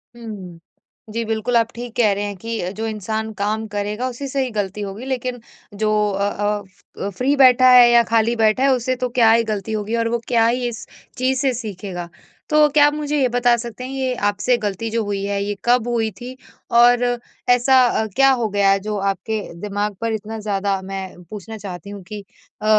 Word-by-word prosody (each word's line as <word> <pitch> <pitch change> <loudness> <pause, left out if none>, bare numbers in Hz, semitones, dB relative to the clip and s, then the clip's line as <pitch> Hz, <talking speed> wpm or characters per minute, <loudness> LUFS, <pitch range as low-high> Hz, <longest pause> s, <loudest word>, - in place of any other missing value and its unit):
हुँ। 200 -7 -9 0.5
जी 230 +1 -1
बिल्कुल, 225 +2 -1
आप 230 0 +1
ठीक 240 -1 -7
कह 220 -4 +4
रहे 200 +1 -3
हैं 205 -1 -4
कि 225 -4 -4
जो 220 +2 -4
इंसान 220 +1 -3
काम 215 +2 -1
करेगा 210 +4 -3
उसी 265 +3 -6
से 275 0 -1
ही 255 - -3
गलती 205 -1 -3
होगी, 200 +5 -6
लेकिन 255 -2 -3 0.4
जो 215 - +2 0.2
अ 200 +1 0
अ 205 -2 -5
अ, 200 - -1
फ्री 255 +8 0
बैठा 255 -2 +6
है 245 -1 +8
या 235 0 +6
खाली 230 +1 +3
बैठा 220 +2 +2
है 275 - +4
उससे 255 +1 -1
तो 250 0 -2
क्या 225 -2 +6
ही 230 0 +4
गलती 215 -1 -4
होगी 215 +1 -2
और 230 0 0
वो 235 - 0
क्या 230 -2 +3
ही 245 +1 0
इस 235 -2 -7 0.3
चीज़ 255 +1 +1
से 265 -2 +1
सीखेगा। 190 -6 -6 0.4
तो 305 0 +5
क्या 290 0 +5
आप 295 - 0
मुझे 300 0 -2
ये 260 - +4
बता 245 0 +4
सकते 235 +1 -7
हैं 255 - -6
ये 260 -1 -1 0.2
आपसे 205 +5 +1
गलती 210 +1 -3
जो 225 0 -1
हुई 200 -1 -3
है 200 0 -1
ये 205 0 -3
कब 245 -1 +3
हुई 230 -2 0
थी? 250 +1 -7 0.4
और 240 +1 +5 0.5
ऐसा 250 +1 +5
अ, 220 - 0
क्या 270 0 +5
हो 240 -4 +1
गया 200 -1 +2
है 195 - +3
जो 210 +1 -4
आपके 215 +3 -4 0.2
दिमाग 205 0 -2
पर 230 -1 -1
इतना 220 +1 -5
ज़्यादा 200 -2 -1
मैं 190 -1 -7
पूछना 215 +1 -8
चाहती 195 -3 -8
हूँ 200 -2 -8
कि 210 0 -7 0.4
अ, - - -5
225 Hz, 215 wpm, -20 LUFS, 205-245 Hz, 0.5 s, है